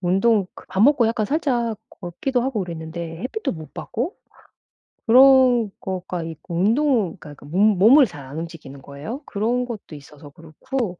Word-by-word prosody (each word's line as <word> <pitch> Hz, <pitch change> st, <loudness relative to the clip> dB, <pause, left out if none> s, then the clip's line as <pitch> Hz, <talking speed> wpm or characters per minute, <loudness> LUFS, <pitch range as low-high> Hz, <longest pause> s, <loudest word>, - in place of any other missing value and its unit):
운동 195 Hz, +3 st, +2 dB
그 -, -, -13 dB
밥 190 Hz, +1 st, -3 dB
먹고 260 Hz, -3 st, +5 dB
약간 225 Hz, -1 st, 0 dB
살짝 245 Hz, -7 st, -1 dB, 0.2 s
걷기도 220 Hz, +8 st, -2 dB
하고 250 Hz, -4 st, -1 dB
그랬는데 165 Hz, 0 st, -7 dB
햇빛도 430 Hz, +13 st, -3 dB
못 160 Hz, -3 st, -10 dB
받고 265 Hz, -, -4 dB, 0.9 s
그런 250 Hz, -3 st, +6 dB
거가 180 Hz, -2 st, -4 dB
있고 165 Hz, +1 st, -8 dB
운동 220 Hz, -, +1 dB
그러니까 145 Hz, -2 st, -13 dB
몸 200 Hz, +6 st, +3 dB
몸을 260 Hz, +8 st, +7 dB
잘 150 Hz, -, -10 dB
안 135 Hz, +3 st, -9 dB
움직이는 160 Hz, -5 st, -8 dB
거예요. 145 Hz, -, -8 dB
그런 235 Hz, +5 st, -1 dB
것도 220 Hz, -9 st, -8 dB
있어서 145 Hz, 0 st, -13 dB
그렇고 175 Hz, -, -5 dB
195 Hz, 320 characters per minute, -22 LUFS, 165-245 Hz, 0.9 s, 몸을